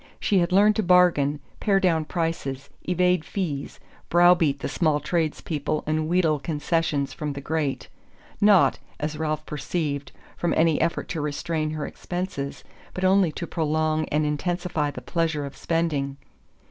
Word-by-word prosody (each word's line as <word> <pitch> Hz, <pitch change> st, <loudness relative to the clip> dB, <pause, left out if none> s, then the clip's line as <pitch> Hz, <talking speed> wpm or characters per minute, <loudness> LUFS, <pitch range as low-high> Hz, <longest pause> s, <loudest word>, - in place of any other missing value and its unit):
She 195 Hz, -, +2 dB
had 175 Hz, 0 st, +1 dB
learned 205 Hz, +3 st, +5 dB
to -, -, +3 dB
bargain, 175 Hz, -6 st, +4 dB, 0.2 s
pare 200 Hz, -2 st, +3 dB
down 165 Hz, -5 st, +2 dB
prices, 150 Hz, -5 st, -3 dB, 0.2 s
evade 180 Hz, -1 st, +2 dB
fees, 160 Hz, -6 st, -4 dB, 0.3 s
brow 175 Hz, +1 st, +7 dB
beat 155 Hz, -5 st, +1 dB
the -, -, -2 dB
small 155 Hz, -3 st, +1 dB
tradespeople 155 Hz, -1 st, -1 dB
and 155 Hz, 0 st, -1 dB
wheedle 165 Hz, -4 st, +2 dB
concessions 150 Hz, -1 st, -1 dB
from 150 Hz, -2 st, -4 dB
the 140 Hz, -, -6 dB
great 145 Hz, -1 st, -2 dB, 0.5 s
not, 205 Hz, -3 st, +5 dB, 0.2 s
as 150 Hz, 0 st, -3 dB
Ralph 155 Hz, -1 st, -2 dB
perceived, 150 Hz, -2 st, -3 dB, 0.2 s
from 175 Hz, -, 0 dB
any 160 Hz, -1 st, +3 dB
effort 165 Hz, +1 st, 0 dB
to 165 Hz, -, -2 dB
restrain 155 Hz, +1 st, -2 dB
her 155 Hz, -1 st, -3 dB
expenses, 175 Hz, -6 st, -5 dB, 0.3 s
but 185 Hz, -, -4 dB
only 185 Hz, -2 st, +4 dB
to 170 Hz, -, -4 dB
prolong 155 Hz, -1 st, 0 dB
and 150 Hz, +1 st, 0 dB
intensify 160 Hz, 0 st, -1 dB
the -, -, -7 dB
pleasure 160 Hz, -4 st, -1 dB
of 140 Hz, -, -8 dB
spending. 150 Hz, -5 st, -1 dB
160 Hz, 150 wpm, -25 LUFS, 150-175 Hz, 0.5 s, brow